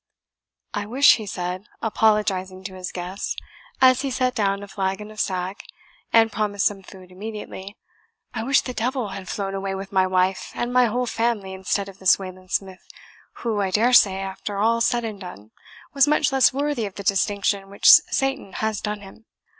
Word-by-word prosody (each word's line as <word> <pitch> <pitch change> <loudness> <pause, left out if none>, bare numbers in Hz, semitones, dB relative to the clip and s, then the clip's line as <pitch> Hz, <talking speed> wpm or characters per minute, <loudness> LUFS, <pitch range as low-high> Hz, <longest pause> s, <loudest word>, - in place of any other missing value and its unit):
"I 205 0 -3
wish," 265 +6 +6
he 215 -3 -7
said, 180 +2 -4
apologizing 205 -4 +1
to 190 0 -7
his 185 -1 -6
guests, 180 +2 -4 0.4
as 255 -1 +5
he 275 - -2
set 255 -1 0
down 200 -3 0
a - - -8
flagon 195 +1 -3
of 215 - -11
sack, 185 +1 -2 0.5
and 225 -1 +5
promised 205 -2 -1
some 200 -2 0
food 185 -1 -14
immediately 200 0 -8 0.6
"I 230 - -3
wish 270 +4 +3
the 250 - -6
devil 245 0 -2
had 190 -1 -8
flown 195 -1 -3
away 195 0 -3
with 195 0 -7
my 190 -1 +3
wife 185 0 0
and 240 +1 -2
my 250 0 +5
whole 245 +2 0
family 225 -5 -1
instead 190 +1 -2
of 195 0 -12
this 190 - +5
Wayland 185 -1 -10
Smith, 190 -1 -3 0.6
who, 215 -3 0
I 195 - 0
daresay, 215 -1 +5
after 195 +1 -5
all 230 +3 +2
said 240 0 +1
and 210 -3 -6
done, 110 - -10 0.4
was 280 0 +4
much 300 0 +2
less 270 -1 +5
worthy 280 -5 -1
of 195 - -11
the 200 - -7
distinction 200 0 0
which 200 - 0
Satan 270 -7 +5
has 220 -1 -2
done 210 -1 -4
him." 205 +3 -14
205 Hz, 185 wpm, -23 LUFS, 190-230 Hz, 0.6 s, wish